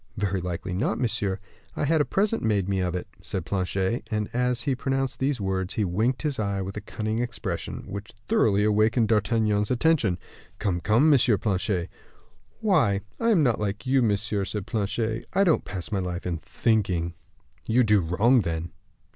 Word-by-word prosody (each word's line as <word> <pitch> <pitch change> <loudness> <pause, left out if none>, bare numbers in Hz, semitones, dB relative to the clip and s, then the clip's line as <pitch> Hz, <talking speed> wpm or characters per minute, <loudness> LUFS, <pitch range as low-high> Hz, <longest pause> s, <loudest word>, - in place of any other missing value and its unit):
"Very 100 -2 -1
likely 90 +1 -4
not, 100 +4 0
monsieur. 105 -6 -1 0.4
I - - 0
had 160 +1 +3
a - - +2
present 210 +3 0
made 100 -4 +1
me 100 -1 0
of 90 -1 -1
it," 90 - -4
said 95 -4 -4
Planchet; 95 +4 -1
and, 105 -1 -2
as 125 0 0
he 140 - 0
pronounced 135 +1 -1
these 135 -1 0
words, 95 -1 -2
he 105 - +1
winked 110 - 0
his 145 -5 -1
eye 100 -2 -1
with 95 0 -4
a 105 - -4
cunning 110 +2 -3
expression, 115 -7 -4
which - - -7 0.2
thoroughly 100 -1 +3
awakened 110 +2 +3
D'Artagnan's 105 -1 +2
attention. 125 - +2 0.4
"Come, 95 -5 -1
come, 120 - +4
M. 120 -5 +4
Planchet." 95 -3 0 0.7
"Why, 140 - +3 0.2
I 230 - +2
am 190 -9 +4
not 120 -5 +2
like 105 +3 -3
you, 130 0 +3
monsieur," 105 -2 0
said 100 0 -4
Planchet. 110 +1 -2
"I 195 - +4
don't 170 -5 +2
pass 95 +1 -5
my 100 - 0
life 90 -1 -4
in 85 -2 -2
thinking." 95 -3 0 0.5
"You 125 +3 +4
do 105 -2 +4
wrong, 105 +9 +3
then." 85 -2 -3
105 Hz, 180 wpm, -26 LUFS, 95-125 Hz, 0.7 s, come